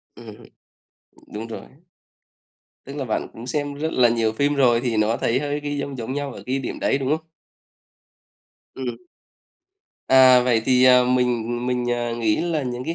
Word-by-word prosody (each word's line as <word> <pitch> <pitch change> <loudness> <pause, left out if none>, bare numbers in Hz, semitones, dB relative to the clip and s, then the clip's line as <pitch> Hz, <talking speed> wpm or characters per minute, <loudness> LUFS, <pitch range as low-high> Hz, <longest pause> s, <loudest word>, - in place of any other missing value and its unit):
Ừm, 115 -3 -11 1.0
đúng 110 +2 -5
rồi. 115 - -7 1.2
Tức 140 +2 -9
là 140 - -3
bạn 110 - -3
cũng 115 +2 -10
xem 145 +1 -3
rất 160 +3 -3
là 125 -1 +4
nhiều 115 -2 0
phim 145 +5 0
rồi 120 -4 +3
thì 120 -3 -2
nó 110 +2 +1
thấy 120 +3 0
hơi 145 0 -3
cái 145 0 -4
giông 140 -1 -5
giống 115 +3 -5
nhau 145 -1 -4
ở - - -10
cái 130 +2 -1
điểm 135 - -5
đấy, 135 - +1
đúng 135 0 -2
không? 160 - -16 1.5
Ừm. 125 -3 -5 1.1
À, 130 -1 +7
vậy 120 -3 +1
thì, 125 0 +4
à, 125 -1 +6
mình 120 -1 0
mình, 125 -1 -1
à, 120 -1 -2
nghĩ 115 -2 0
là 165 -4 -1
những 125 0 -5
cái 165 - -3
125 Hz, 180 wpm, -22 LUFS, 120-140 Hz, 1.5 s, À